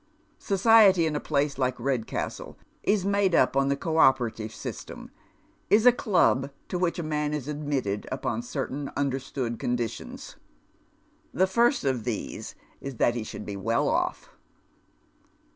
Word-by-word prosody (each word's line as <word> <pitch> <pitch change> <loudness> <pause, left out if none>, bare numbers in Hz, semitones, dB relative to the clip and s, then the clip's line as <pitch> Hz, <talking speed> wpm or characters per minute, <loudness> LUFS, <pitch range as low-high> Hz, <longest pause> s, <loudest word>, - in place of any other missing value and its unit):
Society 195 -3 +5
in 155 -1 -1
a - - 0
place 145 -1 -1
like 130 -1 0
Redcastle 125 -2 -3 0.2
is 200 -2 +1
made 200 -3 +2
up 130 - +3
on 135 0 +3
the 140 - +2
co 160 +2 -2
operative 120 -6 +3
system - - -8 0.3
— - - -37
is 215 +3 +4
a 250 - +9
club 180 - +2 0.2
to 180 - -2
which 175 -2 0
a 170 - -3
man 150 -1 -1
is 145 -3 -5
admitted 145 -9 -2
upon 130 -4 -2
certain 135 +3 -4
understood 135 -4 -2
conditions. 120 -2 -4 1.0
The 185 - +4
first 235 +8 +2
of 130 -5 0
these 115 -4 -5 0.3
is 135 -2 -6
that 120 - +2
he 120 -2 -3
should 105 - -8
be 100 - -5
well 115 +4 0
off." - - -1
140 Hz, 150 wpm, -27 LUFS, 125-175 Hz, 1.0 s, a